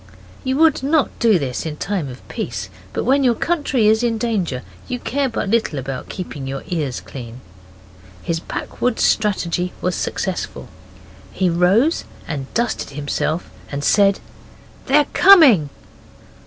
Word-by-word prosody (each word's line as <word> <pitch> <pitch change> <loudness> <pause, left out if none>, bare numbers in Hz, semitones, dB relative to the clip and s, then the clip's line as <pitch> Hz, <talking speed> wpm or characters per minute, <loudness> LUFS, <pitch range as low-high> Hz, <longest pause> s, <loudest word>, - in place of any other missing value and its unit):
You 260 +1 0
would 320 -3 +4
not 290 +2 +2
do 225 -4 +4
this 135 -6 -3
in 155 -2 -5
time 180 -5 -2
of 125 0 -11
peace, - - -4 0.2
but - - -2
when 275 +3 +3
your 245 -3 +3
country 290 -6 0
is 220 +1 +4
in 235 -2 0
danger 195 - -1 0.2
you 250 - -2
care 275 +2 -1
but 225 - -3
little 220 -7 +1
about 135 -1 -5
keeping 150 -7 -6
your 135 0 -5
ears 150 -9 -2
clean. 120 -2 -9 0.8
His 165 -1 -1
backwoods' 245 +7 -2
strategy 180 -4 +1
was 180 - -1
successful. 185 +1 -3 0.6
He 185 -2 +1
rose 195 - +3 0.2
and 140 -4 -5
dusted 235 +1 -1
himself 150 +3 -2 0.2
and 140 0 -3
said 200 +2 +4 0.7
'They're 290 +2 +5
coming! 290 - +7
195 Hz, 140 wpm, -20 LUFS, 150-250 Hz, 0.8 s, coming